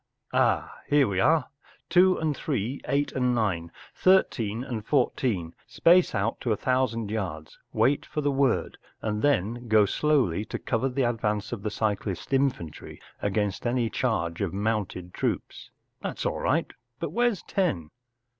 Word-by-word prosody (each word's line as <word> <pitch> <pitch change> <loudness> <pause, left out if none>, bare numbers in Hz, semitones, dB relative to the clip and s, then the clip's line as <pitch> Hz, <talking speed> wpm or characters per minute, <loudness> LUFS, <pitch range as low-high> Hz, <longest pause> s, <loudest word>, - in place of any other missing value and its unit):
“Ah, - - +1
here 145 -3 +4
we 95 -2 -1
are! 155 +5 +3 0.4
Two 185 +1 +5
and 155 -2 -1
Three, 130 -2 -2
Eight 145 +1 +1
and 125 -1 +1
Nine, 90 -7 -1 0.2
Thirteen 120 - +2
and 120 -5 -4
Fourteen, 115 - 0
space 175 -5 +4
out 100 0 -1
to 120 - -1
a 105 - +1
thousand 115 -4 0
yards, 85 -8 -4
wait 140 +3 +2
for - - -4
the 145 -1 +1
word, 135 -2 +1 0.2
and 105 -1 -1
then 120 -3 +1
go 110 -2 +5
slowly 125 - +1
to - - -4
cover 125 +3 -1
the 130 +1 0
advance 105 -3 -1
of 120 -4 -4
the 105 - -2
cyclist 105 0 -2
infantry 130 - -1 0.2
against 105 +1 -1
any 120 -2 0
charge 85 -9 -1
of 95 -2 -2
mounted 100 -4 -2
troops. - - -3 0.3
That’s - - -4
all - - -1
right. - - 0 0.3
But - - -3
where’s 240 -4 +1
Ten 95 - -1
115 Hz, 155 wpm, -27 LUFS, 100-140 Hz, 0.4 s, Two